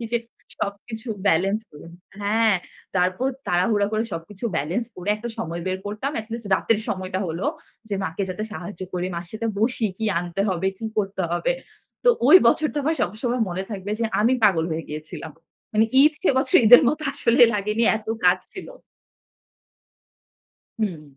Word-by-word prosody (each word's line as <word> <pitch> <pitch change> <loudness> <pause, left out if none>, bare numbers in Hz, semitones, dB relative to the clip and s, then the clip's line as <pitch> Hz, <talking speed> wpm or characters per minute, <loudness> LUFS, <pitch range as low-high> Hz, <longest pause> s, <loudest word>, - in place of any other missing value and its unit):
কি - - -4
যে, - - +4 0.4
সবকিছু 220 +4 -5 0.2
ব্যালেন্স 195 +4 +2
ক - - -50 0.5
হ্যাঁ! 215 +1 +3 0.4
তারপর 185 +8 +1 0.2
তাড়াহুড়া 200 +4 +2
করে 215 0 +1
সবকিছু 190 +6 -7
ব্যালেন্স 170 +11 -1
করে 180 +2 -7
একটা 230 +3 -6
সময় 170 -5 -4
বের 185 0 -1
করতাম, 210 +7 -3
এটলিস্ট 225 +1 -7
রাতের 215 +3 +1
সময়টা 185 0 -2
হলো 165 +4 -3 0.4
যে, 205 - -1
মাকে 165 +3 -3
যাতে 185 +4 -4
সাহায্য 185 -2 -7
করি, 180 0 -1
মার 170 0 -5
সাথে 220 +1 -3
বসি, 225 +1 +1
"কি 220 - -2
আনতে 175 +2 -4
হবে, 185 0 -1
কি - - -7
করতে 195 -2 -1
হবে?" 175 - +1 0.5
তো - - +5 0.2
ঐ - - +4 0.2
বছরটা 300 +3 +1
আমার 320 +2 +1
সবসময় 235 +5 -1
মনে 180 +2 -3
থাকবে 200 -1 -5
যে, - - +1 0.2
আমি 230 +4 +4
পাগল 180 -6 +4
হয়ে 160 +1 -3
গিয়েছিলাম। 155 +1 -7 0.4
মানে 220 - +5 0.2
ঈদ 305 - +6
সে - - +4
বছর 310 +7 +3
ঈদের 245 +6 +10
মতো 310 +1 -1
আসলে 245 -2 +2
লাগেনি 210 +2 0
এত 220 0 -10 0.2
কাজ 180 +1 +5 0.2
ছিল। 375 - -8 2.1
হুম, 180 -8 -2
205 Hz, 165 wpm, -23 LUFS, 180-230 Hz, 2.1 s, ঈদের